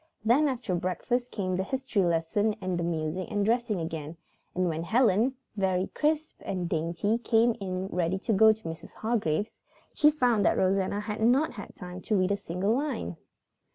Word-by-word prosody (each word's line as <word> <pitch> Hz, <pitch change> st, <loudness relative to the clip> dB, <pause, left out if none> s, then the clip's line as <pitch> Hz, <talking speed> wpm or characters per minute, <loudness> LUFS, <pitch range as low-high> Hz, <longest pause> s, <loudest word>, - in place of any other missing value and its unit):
Then 265 Hz, +7 st, +4 dB
after 245 Hz, -8 st, -2 dB
breakfast 185 Hz, +8 st, -1 dB
came 185 Hz, -5 st, -2 dB
the 190 Hz, -, 0 dB
history 260 Hz, -1 st, -1 dB
lesson 175 Hz, +6 st, +1 dB
and 185 Hz, -1 st, -2 dB
the -, -, -1 dB
music 170 Hz, +2 st, -2 dB
and 205 Hz, -1 st, 0 dB
dressing 230 Hz, -3 st, +1 dB
again, 160 Hz, -1 st, -5 dB, 0.4 s
and 185 Hz, 0 st, +1 dB
when 160 Hz, -1 st, -2 dB
Helen, 230 Hz, +5 st, +2 dB, 0.2 s
very 190 Hz, -2 st, 0 dB
crisp 310 Hz, +1 st, -1 dB
and 180 Hz, -2 st, -2 dB
dainty, 170 Hz, +7 st, 0 dB
came 230 Hz, 0 st, +3 dB
in 185 Hz, -1 st, -3 dB
ready 180 Hz, -1 st, -1 dB
to 220 Hz, +3 st, -1 dB
go 220 Hz, +2 st, +7 dB
to 220 Hz, 0 st, -5 dB
Mrs. 165 Hz, 0 st, -8 dB
Hargrave's, 215 Hz, -4 st, -1 dB, 0.3 s
she 300 Hz, -, +5 dB
found 245 Hz, -8 st, +2 dB
that -, -, +3 dB
Rosanna 195 Hz, +2 st, +1 dB
had 210 Hz, 0 st, -4 dB
not 255 Hz, +7 st, +3 dB
had 205 Hz, -4 st, -9 dB
time 180 Hz, 0 st, -8 dB
to 215 Hz, -, 0 dB
read 185 Hz, +1 st, +2 dB
a -, -, +3 dB
single 195 Hz, +3 st, -1 dB
line. 260 Hz, -, -2 dB
200 Hz, 180 wpm, -28 LUFS, 180-235 Hz, 0.4 s, go